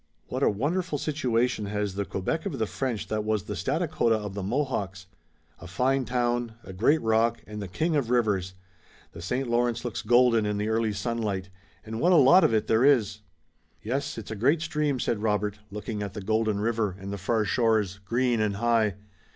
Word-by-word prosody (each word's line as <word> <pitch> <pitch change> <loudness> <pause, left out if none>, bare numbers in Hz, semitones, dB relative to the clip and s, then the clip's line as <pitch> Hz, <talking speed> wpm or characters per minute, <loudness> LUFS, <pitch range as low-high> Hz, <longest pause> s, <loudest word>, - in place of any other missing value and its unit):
What - - -3
a - - +4
wonderful 150 - -1
situation 125 -7 0
has 105 -1 -2
the 100 +1 -2
Quebec 130 - -2
of 140 - -4
the 110 - 0
French 120 -1 -3
that 105 -1 -1
was 110 -2 0
the 105 - -5
Stadacona 135 - 0
of 105 -2 -4
the 100 - -4
Mohawks! 100 -4 -2 0.5
A 90 - -10
fine 130 +8 +1
town, 120 0 -1
a 95 - -9
great 130 +12 +3
rock 110 -5 +2
and 105 +2 -7
the 100 - -5
king 160 - -1
of 135 -6 0
rivers! 100 -7 +1 0.6
The - - -10
St. 125 +9 -2
Lawrence 120 0 0
looks 120 - -3
golden 120 0 +4
in 105 0 -1
the 105 +1 -1
early 110 0 +1
sunlight, 100 -3 -3 0.3
and 110 +1 -5
what 180 +2 +4
a - - +6
lot 160 +5 +7
of - - +4
it 110 -1 +1
there 110 +2 +2
is!" 120 -8 +3 0.6
"Yes, 135 +5 -2
it's 110 -1 -7
a - - -3
great 145 +10 +2
stream," 150 -5 -1
said 115 -3 -1
Robert, 105 -1 0
looking 105 +1 -5
at 100 -2 -4
the 105 - -5
golden 110 0 0
river 110 -3 0
and 100 +1 -6
the 100 - -5
far 110 +3 0
shores, 105 -3 +1
green 120 +2 +1
and 105 -2 0
high. 110 -2 +2
110 Hz, 200 wpm, -27 LUFS, 105-125 Hz, 0.6 s, lot